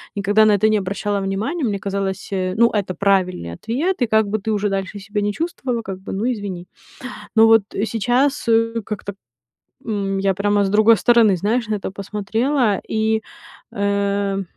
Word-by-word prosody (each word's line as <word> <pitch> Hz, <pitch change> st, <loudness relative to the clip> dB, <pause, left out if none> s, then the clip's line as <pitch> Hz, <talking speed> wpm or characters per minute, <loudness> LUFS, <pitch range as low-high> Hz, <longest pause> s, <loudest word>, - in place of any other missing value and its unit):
никогда 205 Hz, +2 st, +3 dB
на 215 Hz, -, +5 dB
это 210 Hz, +1 st, +3 dB
не 215 Hz, -, +3 dB
обращала 200 Hz, +1 st, -2 dB
внимания. 200 Hz, -, -2 dB
Мне 205 Hz, -5 st, -1 dB
казалось, 195 Hz, -1 st, -3 dB
ну, 190 Hz, +5 st, +2 dB
это 195 Hz, -3 st, -2 dB
правильный 185 Hz, -, 0 dB
ответ, 275 Hz, -, -2 dB
и 245 Hz, -, +4 dB
как 220 Hz, -1 st, +2 dB
бы 215 Hz, -, 0 dB
ты 220 Hz, +2 st, -3 dB
уже 205 Hz, -1 st, 0 dB
дальше 195 Hz, +1 st, -3 dB
себя 205 Hz, +1 st, -3 dB
не 205 Hz, 0 st, -1 dB
чувствовала, 260 Hz, -, -3 dB
как 195 Hz, -3 st, -7 dB
бы 190 Hz, -, -8 dB
ну, 225 Hz, +6 st, 0 dB
извини. 195 Hz, -5 st, -6 dB, 0.7 s
Но 225 Hz, -, +7 dB
вот 225 Hz, -2 st, +5 dB, 0.2 s
сейчас, 245 Hz, +5 st, 0 dB
э, 230 Hz, 0 st, +2 dB
как-то, 200 Hz, -1 st, -6 dB, 0.7 s
м, 195 Hz, -3 st, -2 dB
я 195 Hz, 0 st, +1 dB
прямо 205 Hz, +1 st, +1 dB
с 195 Hz, -, -1 dB
другой 215 Hz, +2 st, +5 dB
стороны, 225 Hz, -4 st, +4 dB
знаешь, 220 Hz, +5 st, -1 dB
на 215 Hz, -, 0 dB
это 195 Hz, -, -5 dB
посмотрела 210 Hz, +4 st, -1 dB
и, 220 Hz, 0 st, 0 dB, 0.5 s
э. 200 Hz, -1 st, -1 dB
205 Hz, 175 wpm, -20 LUFS, 195-225 Hz, 0.7 s, Но